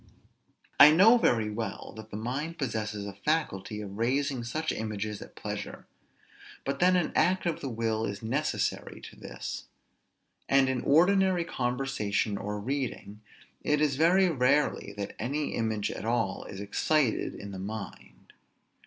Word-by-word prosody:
I 145 Hz, -, +11 dB
know 205 Hz, +10 st, +7 dB
very 110 Hz, -, +2 dB
well 110 Hz, +1 st, -5 dB
that 110 Hz, 0 st, -10 dB
the 105 Hz, -, -6 dB
mind 140 Hz, +9 st, -3 dB
possesses 110 Hz, -6 st, -3 dB
a 100 Hz, -, -6 dB
faculty 105 Hz, -, -2 dB
of 100 Hz, 0 st, -8 dB
raising 135 Hz, +2 st, 0 dB
such 155 Hz, +7 st, -2 dB
images 105 Hz, -1 st, -4 dB
at -, -, -11 dB
pleasure; -, -, -6 dB, 0.8 s
but 140 Hz, 0 st, -2 dB
then 185 Hz, +1 st, +5 dB
an 175 Hz, -3 st, +1 dB
act 180 Hz, +4 st, +2 dB
of 170 Hz, -2 st, -1 dB
the 135 Hz, -, -3 dB
will 115 Hz, -1 st, -1 dB
is 100 Hz, +1 st, -5 dB
necessary 140 Hz, +7 st, -1 dB
to -, -, -11 dB
this; -, -, -7 dB, 0.8 s
and 135 Hz, -1 st, +5 dB
in 130 Hz, -2 st, -1 dB
ordinary 180 Hz, +3 st, +4 dB
conversation 120 Hz, -7 st, -1 dB
or 105 Hz, +1 st, -4 dB
reading 120 Hz, -4 st, -4 dB, 0.4 s
it 150 Hz, 0 st, +1 dB
is 150 Hz, -3 st, +2 dB
very 175 Hz, +6 st, +4 dB
rarely 140 Hz, -, +1 dB
that 100 Hz, -1 st, -5 dB
any 145 Hz, +4 st, -1 dB
image 110 Hz, -2 st, -1 dB
at -, -, -6 dB
all 115 Hz, -4 st, -1 dB
is 95 Hz, -, -8 dB
excited 125 Hz, +5 st, 0 dB
in 100 Hz, 0 st, -8 dB
the 95 Hz, -, -7 dB
mind. 100 Hz, -, -8 dB
120 Hz, 150 wpm, -29 LUFS, 105-150 Hz, 0.8 s, I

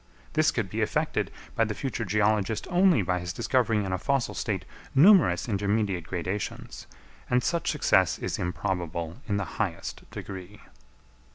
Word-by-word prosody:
This -, -, +4 dB
could -, -, -1 dB
be -, -, -3 dB
effected -, -, 0 dB, 0.3 s
by 115 Hz, -, +3 dB
the 105 Hz, -2 st, -2 dB
future 130 Hz, -2 st, -3 dB
geologist 105 Hz, +1 st, +1 dB
only 180 Hz, -, +4 dB
by 90 Hz, 0 st, 0 dB
his 90 Hz, 0 st, -4 dB
discovering 110 Hz, +1 st, +1 dB
in 95 Hz, -, -2 dB
a 95 Hz, -, -1 dB
fossil 140 Hz, +3 st, 0 dB
state 95 Hz, -4 st, -2 dB, 0.3 s
numerous 150 Hz, -, +6 dB
intermediate 100 Hz, -3 st, 0 dB
gradations; 90 Hz, +3 st, -4 dB, 0.4 s
and 125 Hz, 0 st, +2 dB
such 170 Hz, +1 st, 0 dB
success -, -, +3 dB
is -, -, -3 dB
improbable 90 Hz, -2 st, -3 dB
in 100 Hz, -2 st, 0 dB
the 100 Hz, -, -1 dB, 0.2 s
highest 90 Hz, -7 st, -4 dB
degree. 95 Hz, +1 st, -8 dB
105 Hz, 150 wpm, -27 LUFS, 90-115 Hz, 0.4 s, numerous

